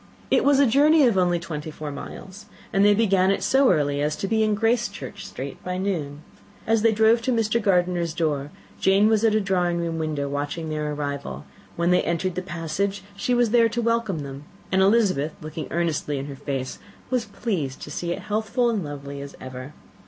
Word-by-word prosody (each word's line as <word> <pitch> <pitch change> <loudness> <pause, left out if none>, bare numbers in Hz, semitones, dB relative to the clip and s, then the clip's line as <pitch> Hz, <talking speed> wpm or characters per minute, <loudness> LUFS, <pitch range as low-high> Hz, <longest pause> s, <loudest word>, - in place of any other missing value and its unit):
It - - +4
was 285 -1 +4
a 280 - +5
journey 290 +5 +5
of 235 -5 +3
only 180 -2 +3
twenty 160 -2 -6
four 150 -1 -6
miles, 190 +8 -9 0.3
and 195 - +4
they 205 0 +6
began 195 -4 +3
it 195 - 0
so 270 -1 +4
early 145 -3 +1
as 150 +1 0
to 195 - -3
be 220 +2 +1
in 215 -1 +2
Gracechurch 225 -2 -1
Street 135 +1 -7
by 180 0 -3
noon. 160 -7 -3 0.4
As 225 0 +2
they 225 0 +4
drove 220 +2 +4
to 255 - 0
Mr. 230 -1 +1
Gardiner's 175 -4 +1
door, 145 -4 -1 0.3
Jane 195 +2 +4
was 220 -1 +2
at 220 -1 +4
a - - +4
drawing 180 -3 0
room 165 -1 -2
window 150 -3 -2
watching 145 +3 -3
their 150 -1 -2
arrival: 140 - -4 0.3
when 170 +1 +1
they 180 - +4
entered 170 +2 -1
the 185 - -3
passage, 180 +3 -3
she 245 +5 0
was 240 -3 +2
there 230 -1 +5
to 235 +2 -3
welcome 230 -8 0
them, 140 +1 -8 0.3
and 190 0 +3
Elizabeth, 190 -8 +3
looking 155 0 -6
earnestly 160 -4 -1
in 135 - -4
her 140 -1 -7
face, 135 -1 -4 0.3
was 250 -3 +1
pleased 190 - -3
to - - -8
see 170 -1 -3
it - - -4
healthful 220 +3 0
and 210 -5 -1
lovely 140 -1 -7
as 140 0 -9
ever. 130 +1 -8
180 Hz, 205 wpm, -24 LUFS, 150-220 Hz, 0.4 s, they